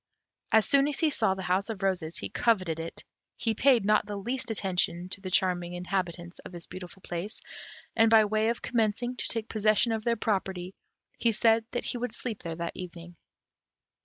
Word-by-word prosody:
As 220 -1 +5
soon 280 0 +4
as 295 - -1
he 315 -2 +4
saw 190 -8 +2
the 190 - -6
House 185 +5 +1
of 210 -3 -5
Roses 175 -4 0
he - - -5
coveted 185 -8 +1
it; 165 0 -6 0.3
he 225 -2 0
paid 245 -1 +4
not 210 0 +3
the 205 -1 -4
least 245 +5 -2
attention 180 -4 -1
to 195 - -5
the 190 - -5
charming 180 -2 +1
inhabitants 180 -1 -3
of - - -10
this 175 -2 -9
beautiful 185 0 -10
place, 175 +5 -3 0.6
and, 225 -1 +5
by 220 -1 +7
way 215 +1 +1
of 235 - -2
commencing 235 +1 0
to - - -3
take 225 -1 0
possession 215 +2 +2
of 220 -1 -1
their 235 0 +2
property, 190 -4 -2 0.5
he 230 - +3
said 225 +1 +3
that 245 - -3
he 245 - -2
would 245 -2 -3
sleep 230 -5 -5
there 165 -2 -4
that 170 0 -4
evening. 175 -1 -8
205 Hz, 195 wpm, -29 LUFS, 180-225 Hz, 0.6 s, by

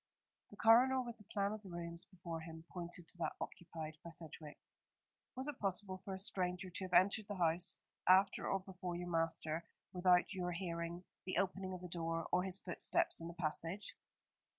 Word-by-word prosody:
The 205 - -13
coroner, 245 +5 +7
with 235 -2 -7
the - - -13
plan 200 0 0
of 215 0 -4
the 195 - -10
rooms 170 0 -3
before 170 -3 -6
him, 160 0 -8
pointed 175 -1 -4
to 175 - -6
that - - 0
occupied 160 -2 -6
by 170 - -6
Sedgewick. 160 -2 -8 0.8
"Was 260 +2 -3
it 295 -3 -4
possible 190 -1 0
for 190 -1 -3
a - - -7
stranger 185 -1 -1
to 190 - -3
have 185 - -8
entered 200 +2 +5
the 205 - -3
house 170 0 +2 0.3
after 190 +1 +6
or 195 - +1
before 185 -2 -5
your 175 0 -4
master 165 0 0 0.3
without 180 +1 +5
your 180 -2 -1
hearing 170 -1 -3 0.2
the 185 - -1
opening 190 -1 0
of 180 - -8
the 180 - -5
door 165 -1 -2
or 180 - +4
his 185 0 +2
footsteps 175 -1 +1
in 165 - -4
the 170 - -7
passage?" 170 +4 -2
180 Hz, 190 wpm, -39 LUFS, 170-195 Hz, 0.8 s, coroner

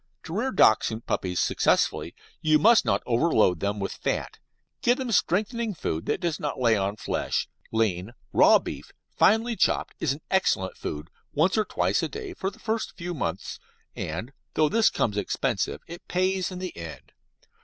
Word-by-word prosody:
To 160 - -7
rear 240 +6 0
Dachshund 110 - +3
puppies 90 -1 -1
successfully - - +1 0.3
you 155 0 +4
must 225 +9 +5
not - - +1
overload 115 - +3
them 100 +2 -1
with 100 - -2
fat - - -3 0.4
give 245 +1 +3
them 260 -3 -3
strengthening 215 +3 +1
food 80 - -3
that - - 0
does 170 -3 -1
not 145 -3 -3
lay 115 -3 +4
on 100 0 -1
flesh. 105 - -2 0.2
Lean, 110 -2 0 0.2
raw - - +7
beef, - - -7 0.2
finely 225 +3 +3
chopped, - - +1
is 150 - +1
an 145 - -10
excellent 95 - +1
food 75 +3 -6 0.2
once 165 +6 +3
or 215 -1 +2
twice - - 0
a - - -2
day 415 -4 -6
for 190 - -2
the 200 - -16
first 220 -2 -3
few 175 0 -4
months, 150 - -4 0.4
and, 90 - -5 0.2
though 155 -1 +3
this 225 +3 +4
comes 105 -2 -1
expensive, 100 +1 -1
it 170 +1 -11
pays 185 0 0
in 185 - -7
the 185 -1 -5
end. 80 -2 -9
155 Hz, 175 wpm, -26 LUFS, -, 0.4 s, raw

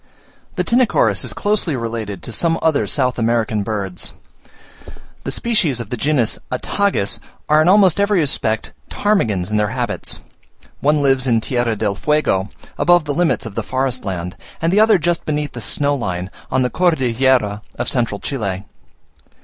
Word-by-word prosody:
The - - 0
Tinochorus 245 -1 +2
is - - -1
closely 205 -7 0
related 115 -6 -4
to - - -5
some 165 -1 +1
other 160 -3 +2
South 125 -3 0
American 115 -2 +1
birds. 100 -3 -3 1.1
Two - - -4
species 180 - 0
of 115 -4 -7
the - - 0
genus 125 -2 0
Attagis 130 - 0 0.3
are 155 +1 +5
in 155 - +2
almost 195 -2 +5
every 200 -1 +3
respect 120 -7 0 0.2
ptarmigans 110 - 0
in 105 - +1
their 105 0 +2
habits; - - -3 0.6
one 150 0 +2
lives 135 -1 +2
in 115 -2 +3
Tierra 120 -1 0
del 105 -1 -1
Fuego, 100 -6 +1 0.3
above 175 -2 +4
the 145 - -1
limits 170 -4 +1
of 110 - -7
the - - -2
forest 130 -1 -1
land; 90 -2 -4 0.2
and 165 +2 0
the 205 - +4
other 220 -1 +6
just 170 0 0
beneath 150 -1 -2
the 120 - -7
snow 145 +6 0
line 90 -7 -3 0.2
on 130 0 +2
the 125 - -1
Cordillera 130 - +2 0.2
of - - -2
Central 115 -5 0
Chile. 100 -8 -3
130 Hz, 165 wpm, -19 LUFS, 110-160 Hz, 1.1 s, other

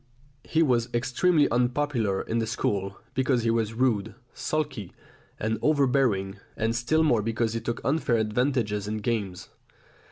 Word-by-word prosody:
He 165 0 +2
was 120 -4 +1
extremely 145 +6 +3
unpopular 120 -4 0
in 115 - -1
the 115 - -1
school, 100 -4 -2 0.2
because 130 -2 +1
he 115 - +2
was 115 -1 0
rude, 110 -4 0 0.2
sulky, 140 - -3 0.5
and 110 0 -1
overbearing, 130 -10 +2 0.2
and 115 +1 0
still 155 +8 +2
more 120 -8 +3
because 115 +1 -1
he 115 - -2
took 115 +1 -3
unfair 140 -3 +1
advantages 110 -2 0
in 110 +1 -2
games. 105 -5 -3
115 Hz, 140 wpm, -26 LUFS, 110-130 Hz, 0.5 s, extremely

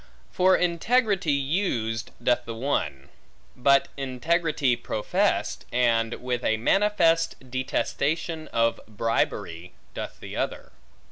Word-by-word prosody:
For 185 0 +4
integrity 195 +1 +1
used 135 - -1
doth 120 0 +2
the 115 - -5
one; 115 - -2 0.5
but 140 +2 +4
integrity 140 +1 +1
professed, 110 -2 -1
and 115 -2 +2
with 125 -1 -3
a 110 - +2
manifest 165 - +2
detestation 155 +5 -1
of 115 0 +1
bribery, 100 -6 -2 0.2
doth - - -6
the - - -8
other. - - -3
130 Hz, 105 wpm, -26 LUFS, 115-165 Hz, 0.5 s, For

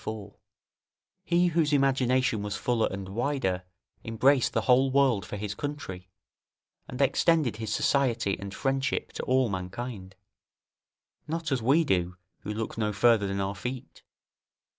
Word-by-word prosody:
4.] 105 -2 -6 0.9
he 175 0 +2
whose 160 -2 +1
imagination 130 -4 +2
was 105 0 -3
fuller 120 -1 +1
and 95 0 -6
wider, 115 -4 -1 0.4
embraced 130 +4 +2
the - - 0
whole 130 +1 +4
world 130 -8 +2
for 105 - -5
his 105 0 -4
country, 95 -12 -6 0.8
and 125 - -8
extended 140 -2 +2
his 110 -1 -4
society 120 -8 +1
and 100 -1 -6
friendship 135 +5 -1
to - - -5
all 130 0 +3
mankind; 95 +1 -6 1.1
not 160 -1 -3
as 130 -3 +1
we 140 +8 +4
do, 90 - 0 0.2
who - - -6
look 110 +1 -4
no 105 -1 0
further 105 0 +3
than 100 0 -2
our 95 0 -1
feet. 125 +5 -7
120 Hz, 140 wpm, -28 LUFS, 100-135 Hz, 1.1 s, whole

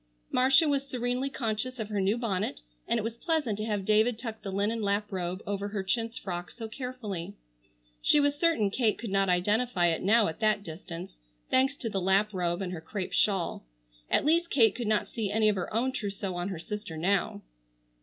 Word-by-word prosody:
Marcia 265 +5 +5
was 275 -1 0
serenely 250 +2 -1
conscious 250 -1 -2
of 220 -3 -4
her 205 -2 0
new 200 +4 +2
bonnet, 200 - -2 0.3
and - - +2
it 220 - -1
was 230 +1 -4
pleasant 300 - 0
to 215 +1 -3
have 205 -3 -1
David 215 +3 +3
tuck 225 -2 -6
the 195 - -5
linen 205 +4 0
lap 205 0 0
robe 185 0 -3
over 200 0 -2
her 205 -1 -3
chintz 230 +4 -1
frock 175 -4 -5
so 225 -2 -7
carefully. 225 -7 -5 0.7
She 295 - +5
was 285 0 +3
certain 290 - +2
Kate 220 -1 +1
could 225 -4 -5
not 195 -1 +2
identify 185 +1 +2
it 165 - 0
now 220 +3 +4
at 160 - -5
that 215 -2 +2
distance, 170 +1 -8 0.3
thanks 265 +2 +3
to 250 - -5
the 195 -3 -1
lap 195 +3 +2
robe 175 0 -1
and 180 -1 -4
her 165 - -5
crêpe 185 +2 -5
shawl. 190 -5 +1 0.5
At - - +2
least 335 +3 +3
Kate 225 -7 +5
could 235 -2 -4
not 215 -1 +2
see 215 -4 -3
any 215 0 +3
of 210 - +1
her 180 - -3
own 235 +4 +1
trousseau 200 -6 -3
on 175 +2 -3
her 190 - -4
sister 205 -2 -6
now. 190 +4 0
210 Hz, 205 wpm, -29 LUFS, 190-240 Hz, 0.7 s, Marcia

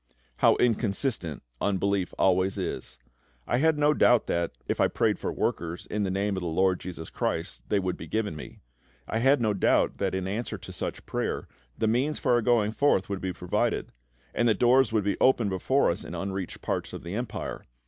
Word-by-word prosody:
How - - +5
inconsistent 110 - 0 0.2
unbelief 100 -1 0
always 95 0 +2
is! 65 - -4 0.5
I 120 - +1
had 160 +1 +3
no 150 0 +4
doubt 120 -4 +4
that, 85 -1 -1 0.2
if - - 0
I - - +5
prayed - - 0
for - - -2
workers, 85 +1 -2
"in 105 - -1
the 100 - 0
Name" 100 +1 0
of 95 - -3
the 90 - -3
LORD 90 +2 +2
JESUS 85 -3 -7
CHRIST, 80 +3 -3
they 105 - +2
would 95 -2 -1
be - - -8
given 110 -6 -1
me. 75 - -10 0.5
I 110 - -1
had 135 +4 +4
no 110 -3 +1
doubt 100 - +2
that, - - 0
in 95 0 -2
answer 110 +5 -3
to - - -10
such - - -5
prayer, - - -2 0.3
the - - 0
means 130 +7 +1
for 130 - 0
our 120 -1 +4
going 110 -2 +2
forth 110 -6 +2
would 100 -1 -3
be 95 - -2
provided, 90 0 -1 0.4
and 120 0 +2
that 110 - +2
doors 125 +2 +4
would 110 -2 +1
be 100 0 -1
opened 120 -6 +4
before 130 +8 +2
us 90 - -5
in - - -7
unreached 95 -2 -4
parts - - -2
of - - -7
the 85 +2 -6
Empire. 120 +1 -4
100 Hz, 205 wpm, -27 LUFS, 95-120 Hz, 0.5 s, How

